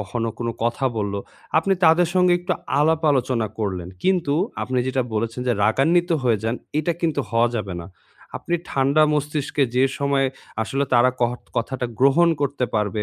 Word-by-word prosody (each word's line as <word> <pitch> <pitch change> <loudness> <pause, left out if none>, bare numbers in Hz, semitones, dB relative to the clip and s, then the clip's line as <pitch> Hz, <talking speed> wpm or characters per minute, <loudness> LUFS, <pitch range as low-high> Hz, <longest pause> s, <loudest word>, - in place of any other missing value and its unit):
কখনো 115 +3 -3
কোনো 115 -1 -2
কথা 120 +3 -1
বললো, 100 -1 -2 0.4
আপনি 195 +4 +1
তাদের 165 +1 +5
সঙ্গে 180 -1 +4
একটু 180 +1 -1 0.3
আলাপ 160 +2 +3
আলোচনা 125 -4 +1
করলেন। 95 -5 -3 0.2
কিন্তু 175 -6 +2 0.3
আপনি 130 -1 -1
যেটা 130 0 0
বলেছেন 115 +3 -2
যে - - +4
রাগান্বিত 170 +10 +2
হয়ে 115 -4 +2
যান, 115 +2 0 0.2
এটা 170 +3 0
কিন্তু 160 -4 0
হওয়া 115 +1 +3
যাবে 100 -5 -3
না। 85 - -9 0.5
আপনি 175 - -3 0.2
ঠান্ডা 140 +3 +3
মস্তিষ্কে 150 -1 -1
যে 130 - +5
সময়ে 140 -1 +1 0.4
আসলে 135 +5 -1
তারা 120 +1 +5
কহট 120 +1 0
কথাটা 125 +1 -2
গ্রহণ 140 +6 +5
করতে 140 -2 0
পারবে, 105 0 0
130 Hz, 165 wpm, -22 LUFS, 115-155 Hz, 0.5 s, তাদের